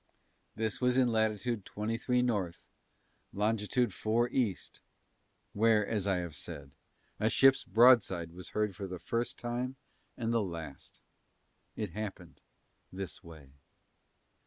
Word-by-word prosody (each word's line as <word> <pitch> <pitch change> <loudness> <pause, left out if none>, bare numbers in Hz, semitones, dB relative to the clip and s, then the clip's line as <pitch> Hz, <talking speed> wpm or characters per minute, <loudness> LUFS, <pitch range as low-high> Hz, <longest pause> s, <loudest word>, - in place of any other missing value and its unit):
This 110 +1 -2
was 125 0 +3
in 130 -2 +4
Latitude 110 0 0
23 115 +5 -1
North, 100 -8 -2 0.7
Longitude 105 +2 +1
4 115 +5 +1
East, 115 -8 -2 0.7
where, 110 0 +4
as 100 -2 -1
I 95 - +3
have 85 -3 -4
said, 75 -6 -7 0.5
a 110 - +2
ship's 135 +3 +5
broadside 110 -8 +5
was 90 +2 -9
heard 105 -3 -1
for 100 +2 -5
the 90 0 -6
first 115 +8 -2
time 120 +2 -3 0.4
and 115 -1 -1
the 115 - +3
last. 85 -7 -7 0.7
It 105 -5 -3
happened 95 -3 -7 0.5
this 95 -4 -6
way. 80 -5 -13
105 Hz, 125 wpm, -32 LUFS, 90-120 Hz, 0.7 s, ship's